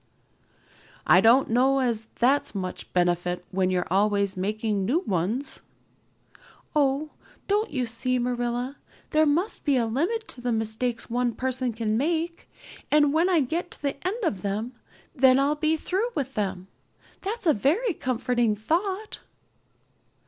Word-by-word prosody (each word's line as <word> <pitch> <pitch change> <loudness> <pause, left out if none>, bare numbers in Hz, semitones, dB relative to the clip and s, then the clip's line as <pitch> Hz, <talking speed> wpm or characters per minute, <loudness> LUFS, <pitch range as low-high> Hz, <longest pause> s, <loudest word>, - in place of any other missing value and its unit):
"I - - +6
don't 240 +4 +5
know 260 +3 +3
as 235 -4 -1
that's 275 0 +2
much 185 -2 -5
benefit 175 0 0
when 185 0 +1
you're 180 -1 0
always 200 0 +2
making 210 +1 -1
new 270 - +1
ones." 210 - -2 1.2
"Oh, 290 +1 +1 0.4
don't 420 +2 +1
you 255 -3 -1
see, 245 +2 -1
Marilla? 245 +2 -2 0.3
There 310 0 +4
must 340 +9 0
be 285 -3 +2
a 235 - +2
limit 345 - -1
to 245 - -8
the 245 0 -1
mistakes 225 +2 -1
one 240 0 -1
person 255 -1 -1
can 220 -1 -1
make, 335 +3 -2 0.4
and 295 -1 +4
when 335 +4 +3
I 345 -4 +4
get 330 +7 -2
to - - -12
the 280 0 -3
end 440 +5 -3
of 205 - -1
them, 210 +5 -3 0.4
then 260 -3 +5
I'll 280 +2 +3
be 310 +1 +1
through 390 +9 -1
with 270 -2 -2
them. 190 -3 -3 0.5
That's 425 +2 -4
a 315 - +5
very 340 - +1
comforting 245 -4 0
thought." 375 - -2
255 Hz, 150 wpm, -26 LUFS, 220-310 Hz, 1.2 s, I